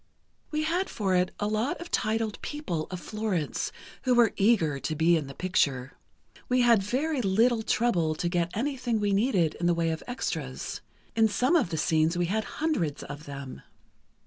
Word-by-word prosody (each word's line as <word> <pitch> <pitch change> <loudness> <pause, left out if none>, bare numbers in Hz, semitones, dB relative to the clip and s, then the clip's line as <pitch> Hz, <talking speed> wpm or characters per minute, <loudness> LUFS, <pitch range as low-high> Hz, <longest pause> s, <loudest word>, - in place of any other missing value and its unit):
"We 305 0 -1
had 350 +5 0
for 195 -3 -1
it 180 0 +2
a 205 - 0
lot 215 +5 -1
of 345 +1 -9
titled 220 -1 0
people 180 - -3
of 185 - -5
Florence, 205 -6 -2 0.3
who 255 -2 +2
were 235 -3 +5
eager 190 -10 +3
to 155 - -3
be 165 +2 +4
in 155 -4 -1
the 135 - -9
picture. 135 -8 0 0.6
We 250 0 +3
had 235 -4 +5
very 265 +8 -1
little 225 +3 +3
trouble 180 -9 +1
to 175 - -2
get 170 -1 0
anything 245 -3 -1
we 205 -1 +1
needed 195 - +2
in 175 - +1
the 175 - +3
way 165 -1 +1
of 160 - -4
extras. 245 0 -4 0.3
In 225 -1 +5
some 250 +9 +2
of 280 - +3
the 160 - -2
scenes, 160 +2 +2
we 175 - +2
had 215 +5 -1
hundreds 200 - -1
of 145 +2 -8
them. 140 -2 -8
200 Hz, 185 wpm, -28 LUFS, 165-240 Hz, 0.6 s, were